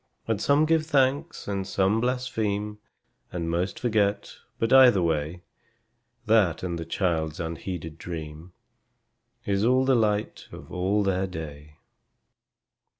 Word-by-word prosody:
And 110 -3 0 0.3
give 160 -1 +2
some - - -17
thanks, 140 +3 +1
and 100 -2 -2
some 100 +3 +1
blaspheme, 110 -4 -2 0.5
And 85 -2 -3
most 90 +3 -2
forget, 105 -4 0 0.2
but, 115 +3 +1
either 125 -8 +7
way, 80 +2 -1 0.8
That 105 -7 +3
and 85 -2 -3
the 85 - -5
child's 80 -3 -1
unheeded 80 -1 -5
dream 80 0 -7 0.9
Is 100 0 0
all 130 +3 +3
the 135 - +3
light 105 -3 0
of - - -11
all 95 +3 +1
their 95 -1 0
day. 75 -3 -9
95 Hz, 125 wpm, -26 LUFS, 85-115 Hz, 0.9 s, either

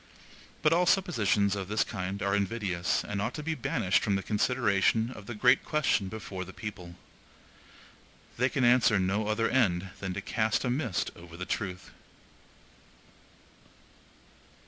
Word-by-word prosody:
But 155 - +5
all 175 +1 +3
suppositions 105 - +2
of 95 -2 -4
this 105 +2 +1
kind 95 0 -4
are 100 0 +1
invidious, 100 -3 -1
and 100 -1 -3
ought - - -2
to 150 - -5
be 160 +2 -1
banished 120 -10 +1
from 100 - +1
the 95 - -2
consideration 110 0 +1
of 105 -5 -11
the 120 - -5
great 125 +4 +4
question 140 -10 +1
before 95 -2 -6
the 95 +1 -11
people. 90 -5 -7 1.4
They 125 +2 +2
can 135 -1 -1
answer 120 -3 +5
no 95 +3 0
other 110 +1 +1
end 95 -7 +1
than 95 -2 -4
to 100 - -3
cast 110 +4 0
a 125 - +1
mist 125 - -1
over 85 -1 -12
the 90 - -5
truth. 90 -3 -4
105 Hz, 150 wpm, -29 LUFS, 95-120 Hz, 1.4 s, But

